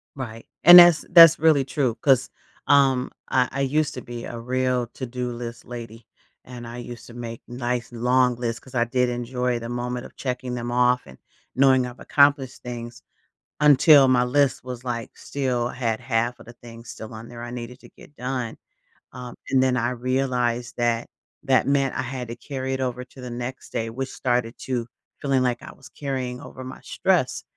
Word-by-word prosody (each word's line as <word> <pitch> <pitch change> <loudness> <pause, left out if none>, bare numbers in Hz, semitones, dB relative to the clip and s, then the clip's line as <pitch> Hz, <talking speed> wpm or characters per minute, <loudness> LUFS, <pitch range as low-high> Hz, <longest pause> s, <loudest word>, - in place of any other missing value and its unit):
Right. 115 -4 -7 0.2
And 175 +1 +12
that's 175 -2 +7
that's 165 -2 +9
really 155 -4 +4
true 130 -4 -1
'cause, 135 -3 +3 0.4
um, 135 -3 +3 0.2
I 125 -1 +2
I 140 - -3
used 150 +3 0
to - - -6
be 120 -2 -8
a 120 - -7
real 125 0 -1
to-do 125 -1 -5
list 120 0 -7
lady, 115 -2 -9 0.4
and 120 -2 -9
I 120 +1 -8
used 120 -1 -9
to 120 - -12
make 115 -1 -7
nice 120 -1 -3
long 125 +1 +2
lists 115 -1 -3
'cause 130 -1 -15
I 120 0 +2
did 125 +1 +1
enjoy 120 0 -2
the 115 0 -7
moment 125 +1 -4
of - - -13
checking 125 -1 -4
them 120 0 -4
off 125 0 +3
and 65 - -14 0.4
knowing 130 -1 +4
I've 125 0 -9
accomplished 140 -3 +2
things 120 -1 -7 0.6
until 145 -1 +7
my 125 -1 +4
list 135 +1 +1
was, 125 -1 -7
like 120 -2 -5
still 125 -4 -2
had 120 -2 -2
half 120 -1 -1
of - - -15
the 120 - -11
things 115 -1 -12
still 110 0 -9
on 110 +1 -9
there 120 -1 -9
I 120 - -6
needed 125 +1 -8
to - - -15
get 145 - -18
done. 125 -2 -4 0.6
Um, 125 -1 -8
and 130 -1 +3
then 130 -1 +2
I 120 +1 0
realized 125 -1 -1
that, 120 -1 0 0.4
that 135 -2 +2
meant 140 -1 +1
I - - -1
had 130 -1 -5
to 120 - -5
carry 130 +1 -5
it 130 - -3
over 125 -1 -3
to 130 0 -15
the 125 - -7
next 120 +2 -6
day 115 0 -2
which 130 +3 -5
started 120 -2 -1
to 120 -3 -3 0.3
feeling 135 -3 +1
like 120 -1 -1
I - - -10
was 135 - -15
carrying 130 -3 -4
over 130 - -10
my 130 - -9
stress. - - 0
125 Hz, 195 wpm, -24 LUFS, 120-130 Hz, 0.6 s, And